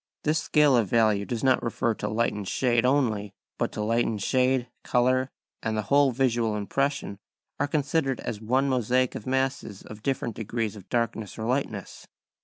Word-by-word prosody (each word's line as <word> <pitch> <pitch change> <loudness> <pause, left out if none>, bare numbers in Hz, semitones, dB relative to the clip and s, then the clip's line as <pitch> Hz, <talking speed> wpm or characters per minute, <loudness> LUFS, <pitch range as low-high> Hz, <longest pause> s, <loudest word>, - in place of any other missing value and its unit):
This 155 +1 +2
scale 150 -3 +4
of 115 -4 +2
values 110 -2 +2
does 120 -2 -3
not 130 -1 +4
refer 115 0 0
to 105 - -4
light 115 +3 0
and 105 -2 -5
shade 120 +1 +2
only, 110 -7 +1 0.2
but - - -2
light 115 +3 +1
and 110 -2 -2
shade, 130 +3 +1 0.2
colour, 130 +1 +2 0.3
and 110 0 -2
the 110 - 0
whole 140 -1 +6
visual 120 -4 +1
impression 135 0 -2 0.4
are 145 - +1
considered 145 -2 0
as 110 -3 -5
one 130 +5 +1
mosaic 125 0 +1
of 105 - -7
masses 130 -6 -1
of 110 -1 -11
different 120 -3 -2
degrees 110 -1 -3
of 100 -3 -13
darkness 115 -3 -2
or 110 - -4
lightness. 115 -4 -3
120 Hz, 175 wpm, -26 LUFS, 110-130 Hz, 0.4 s, whole